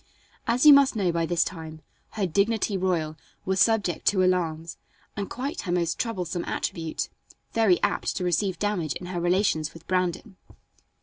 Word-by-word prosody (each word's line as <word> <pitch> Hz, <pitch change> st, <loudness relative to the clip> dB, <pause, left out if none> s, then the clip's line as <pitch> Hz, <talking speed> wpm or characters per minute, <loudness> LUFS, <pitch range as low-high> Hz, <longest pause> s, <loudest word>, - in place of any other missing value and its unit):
As 245 Hz, +4 st, +2 dB
you 300 Hz, -, +11 dB
must 280 Hz, -3 st, +5 dB
know 190 Hz, -5 st, +1 dB
by 165 Hz, -1 st, -1 dB
this 175 Hz, 0 st, +2 dB
time, 160 Hz, -3 st, -7 dB, 0.3 s
her 205 Hz, -3 st, -1 dB
"dignity 205 Hz, +4 st, +1 dB
royal" 175 Hz, -5 st, -1 dB, 0.3 s
was 190 Hz, 0 st, 0 dB
subject 220 Hz, -6 st, +2 dB
to 190 Hz, -2 st, +4 dB
alarms, 165 Hz, -3 st, 0 dB, 0.4 s
and 200 Hz, -2 st, -4 dB
quite 275 Hz, +7 st, -4 dB
her 175 Hz, -, -4 dB
most 170 Hz, -2 st, 0 dB
troublesome 180 Hz, -7 st, -2 dB
attribute 165 Hz, -4 st, -3 dB, 0.5 s
very 220 Hz, -6 st, +4 dB
apt -, -, 0 dB
to -, -, -2 dB
receive 180 Hz, +1 st, 0 dB
damage 180 Hz, -8 st, -1 dB
in 180 Hz, -, -7 dB
her 175 Hz, -, -2 dB
relations 175 Hz, -4 st, +1 dB
with 165 Hz, 0 st, -13 dB
Brandon. 185 Hz, +2 st, -2 dB
185 Hz, 165 wpm, -26 LUFS, 170-205 Hz, 0.5 s, you